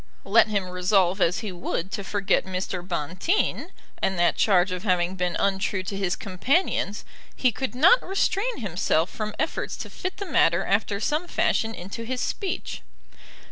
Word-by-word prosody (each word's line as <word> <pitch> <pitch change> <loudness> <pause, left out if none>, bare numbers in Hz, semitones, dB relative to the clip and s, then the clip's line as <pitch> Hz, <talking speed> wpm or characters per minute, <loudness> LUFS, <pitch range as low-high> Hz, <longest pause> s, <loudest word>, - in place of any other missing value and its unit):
Let 215 +3 +5
him 200 -3 -1
resolve 180 +1 +2
as 175 +1 +2
he 215 -4 -4
would 175 +1 -4
to 200 - -3
forget 200 0 +1
Mr. 185 -1 -3
Bonteen, 180 - -1 0.3
and 190 - 0
that 175 -1 +3
charge 190 -2 +3
of 180 -1 -3
having 180 -3 +1
been 180 -2 -1
untrue 195 0 0
to 190 +2 -5
his 190 -3 0
companions, 210 - 0 0.3
he 255 - +2
could 260 +1 -4
not 365 - +6
restrain 395 - 0
himself 175 -3 0
from 215 -1 -4
efforts 315 - -2
to - - -7
fit 370 0 -5
the 400 - -4
matter 175 - +3
after 200 0 0
some 305 - -1
fashion 225 -8 0
into 195 +6 -7
his 250 +2 -3
speech. 390 - -3
195 Hz, 165 wpm, -25 LUFS, 180-235 Hz, 0.3 s, not